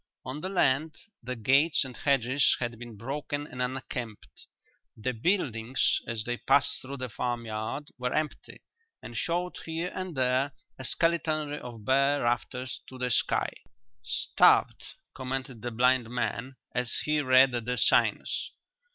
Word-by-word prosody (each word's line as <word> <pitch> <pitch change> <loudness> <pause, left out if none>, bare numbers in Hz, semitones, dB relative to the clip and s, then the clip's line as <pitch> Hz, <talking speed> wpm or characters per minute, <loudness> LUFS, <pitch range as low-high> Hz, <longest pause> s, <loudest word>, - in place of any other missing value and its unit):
On 130 +4 -5
the 185 - -3
land, 155 -4 +2 0.3
the 125 +2 -4
gates 135 +7 +4
and 130 -2 -8
hedges 135 0 +3
had 120 -2 -3
been 120 -3 -9
broken 145 +5 -4
and 125 -3 -7
unkempt; 125 -3 -5 0.5
the 125 +4 -2
buildings, 125 - +1
as 115 -2 -3
they 120 +1 -2
passed 140 - +3
through 140 +2 -7
the 130 -1 -3
farmyard, 120 +3 -3
were 125 0 -1
empty 155 -1 -3 0.4
and - - -8
showed 175 +1 -1
here 165 +2 -3
and 185 -5 -5
there 130 +2 +2 0.3
a - - -5
skeletonry 155 -2 +1
of 115 -4 -9
bare 140 +2 +3
rafters 125 +2 -2
to 130 - -10
the 125 -1 -1
sky. - - +2 0.5
"Starved," 115 - +3 0.3
commented 130 -3 -4
the 120 - -3
blind 125 0 +2
man, 125 +1 -3 0.2
as 125 -1 0
he 150 0 +2
read 130 -1 +6
the 125 +1 -2
signs. - - +2
130 Hz, 145 wpm, -29 LUFS, 120-145 Hz, 0.5 s, read